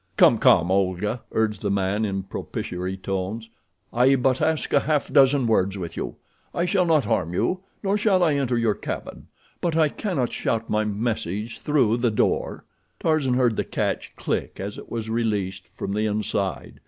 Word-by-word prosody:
"Come, - - +6
come, 85 - +5
Olga," 100 +4 0
urged 110 -2 0
the 100 - -1
man, 100 +2 0
in 95 -2 -2
propitiary 95 0 -5
tones; 95 +4 -4 0.4
"I 125 +3 +5
but 130 +1 +1
ask 155 0 0
a - - +6
half 150 0 -1
dozen 135 -2 +5
words 100 -3 +2
with 85 -3 -6
you. - - -4 0.4
I 170 - +1
shall 180 0 +2
not 155 -6 +3
harm 90 -6 0
you, 185 - 0 0.2
nor 200 +1 +1
shall 195 -4 +3
I 160 -3 +3
enter 130 -4 0
your 115 -2 +2
cabin; - - -6 0.3
but 170 -2 0
I 155 -2 +4
cannot 155 - -2
shout 115 0 -2
my 110 0 +2
message 105 0 -3
through 130 -7 +2
the 120 0 +2
door." 105 - 0 0.3
Tarzan 150 -6 +1
heard 125 -3 +2
the - - +1
catch - - -3
click - - -3
as 100 +2 -4
it - - -12
was 115 -1 -4
released 100 -5 -1
from 95 - -6
the 105 +2 0
inside. 105 -2 -2
115 Hz, 180 wpm, -24 LUFS, 100-135 Hz, 0.4 s, Come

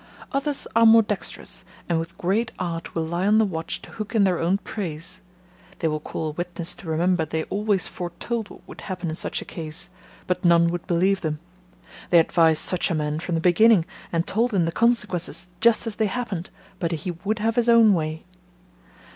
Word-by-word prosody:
Others 275 +1 -1
are 230 0 +7
more 225 0 +8
dexterous, 210 -1 -3 0.2
and 170 -2 +1
with 165 +1 -6
great 215 +6 0
art 170 -2 -4
will 165 -1 0
lie 170 +4 -1
on 210 +1 +5
the 220 - +5
watch 165 -4 -4
to - - -12
hook 215 +1 -6
in 215 - +5
their 185 -3 +2
own 175 +4 +2
praise: 185 -3 -5 0.6
They 165 - 0
will 155 0 -1
call 155 +1 -4
a - - -4
witness 175 +1 -4
to 180 - -11
remember 170 +2 +1
they 160 +1 -2
always 205 -1 0
foretold 195 +6 -4
what - - -14
would - - -10
happen 180 -3 -4
in - - -4
such - - -3
a - - -20
case, 160 +1 -4 0.3
but 180 - -1
none 170 -1 +5
would 175 0 -4
believe 190 +2 +2
them; 155 -2 -2 0.7
they 175 - +6
advised 165 -1 +4
such 180 - 0
a 170 - 0
man 150 0 -1
from 170 +1 -2
the 165 - 0
beginning, 185 +1 +5 0.3
and 165 0 0
told 230 +1 0
him 175 -3 +3
the 165 - -1
consequences, 210 -5 0
just 235 0 +4
as 225 -2 -5
they 220 - +2
happened; 200 -5 -4 0.3
but 170 -1 -1
he 165 +2 -3
would 215 +2 0
have 225 +1 0
his 240 -1 +2
own 230 -3 +7
way. 160 -2 -2
180 Hz, 205 wpm, -24 LUFS, 165-215 Hz, 0.7 s, more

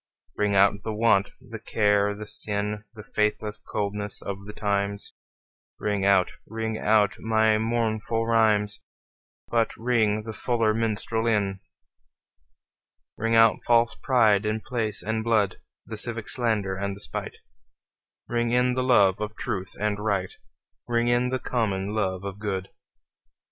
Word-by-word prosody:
Ring 105 -1 +1
out 100 +1 +4
the 110 0 -4
want, 105 -3 +3
the 115 -1 -9
care 105 -2 +1
the 105 +1 -7
sin, 105 0 -1
The 105 - -9
faithless 105 0 -1
coldness 105 0 -3
of 100 0 -6
the - - -6
times; 100 -1 -2 0.7
Ring 100 -2 -1
out, 95 -2 +4 0.2
ring 110 0 -3
out 105 -1 +3
my 110 -1 +2
mournful 115 0 -1
rhymes, 110 -3 +2 0.7
But 115 -1 0
ring 110 -3 +1
the 110 0 -6
fuller 115 -2 +1
minstrel 115 0 -1
in. 100 -3 0 1.6
Ring 115 +1 0
out 115 -1 +5
false 115 -1 +3
pride 110 -6 +3
in 110 +1 -1
place 110 -4 -2
and 110 0 -2
blood, 110 -5 +1 0.3
The 110 - -7
civic 115 0 0
slander 110 -6 +2
and 100 0 -3
the - - -12
spite; - - -5 0.9
Ring 120 0 0
in 125 +1 +2
the 130 - 0
love 105 -7 +4
of 105 0 -4
truth 95 -6 -4
and 105 0 -1
right, 100 -3 -1 0.5
Ring 120 0 +1
in 120 +1 +2
the 130 - 0
common 105 -6 -2
love 95 -3 -1
of 100 0 -6
good. 95 -3 -3
110 Hz, 145 wpm, -25 LUFS, 100-115 Hz, 1.6 s, out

